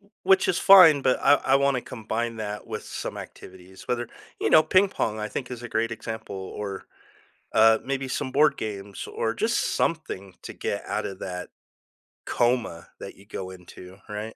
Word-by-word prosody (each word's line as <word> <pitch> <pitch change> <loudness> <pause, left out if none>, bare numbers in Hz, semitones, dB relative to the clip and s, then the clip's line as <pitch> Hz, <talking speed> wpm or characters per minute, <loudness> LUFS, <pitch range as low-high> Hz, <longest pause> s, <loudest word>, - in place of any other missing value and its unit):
W 200 0 -28
which 190 0 +4
is 175 - +2
fine, 175 -8 +8
but 130 - +2
I 145 - +6
I 135 - +1
wanna 140 -2 +2
combine 115 0 -4
that 105 -1 -6
with - - -5
some - - -6
activities, 95 +1 -12
whether 120 -1 -2 0.3
you - - +1
know, 155 - +7
ping 190 +2 +4
pong, 110 - -2
I 105 - -3
think, 125 +3 -5
is 120 -1 -7
a 120 - -6
great 115 +1 -1
example 110 -2 -6
or, 95 +1 -6 0.6
uh, 110 0 +6
maybe 135 0 -3
some 130 0 -3
board 150 +3 +3
games 100 -2 -6
or 115 0 -3
just 230 +2 +1
something 100 - -2
to - - -8
get - - -4
out - - -2
of 95 - -6
that 90 -1 -6 0.8
coma 120 -8 0
that - - -9
you 100 - -18
go 95 -3 -6
into, 90 +1 -13
right? 105 +2 -6
115 Hz, 185 wpm, -25 LUFS, 100-135 Hz, 0.8 s, fine